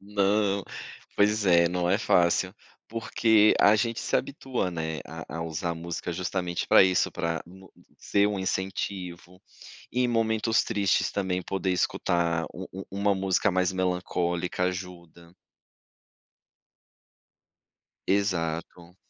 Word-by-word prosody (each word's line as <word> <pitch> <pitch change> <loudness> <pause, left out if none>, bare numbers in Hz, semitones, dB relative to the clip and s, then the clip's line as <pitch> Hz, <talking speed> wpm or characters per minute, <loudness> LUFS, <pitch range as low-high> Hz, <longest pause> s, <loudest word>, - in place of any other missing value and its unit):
"Não". 100 0 +1 0.5
Pois 105 0 +2
é, 85 -1 +5
não 90 0 -1
é 95 - +3
fácil, 90 -1 +2 0.3
porque 110 -1 +3
a 105 +1 +6
gente 115 +2 -1
se - - +1
habitua, 130 -9 -3
né, 80 -2 -4
a 80 - -8
a 80 - -2
usar 85 +1 -3
música 85 +1 -5
justamente 90 0 -3
pra - - +7
isso, 95 -1 +2
pra 85 0 -2
mo 95 +1 -16 0.3
ser 100 0 +2
um 105 - -2
incentivo, 95 -1 -4 0.5
e 125 - 0
em 125 - +2
momentos 110 -1 +1
tristes 100 -4 +1
também 95 -2 -1
poder 95 +1 -2
escutar 85 -2 0
um 95 - -7
um 95 - -6
uma 100 +1 +1
música 95 +2 +1
mais 90 0 +1
melancólica 90 -1 -1
ajuda. 90 -2 -6 2.7
Exato. 90 -2 -2
95 Hz, 125 wpm, -27 LUFS, 85-100 Hz, 2.7 s, pra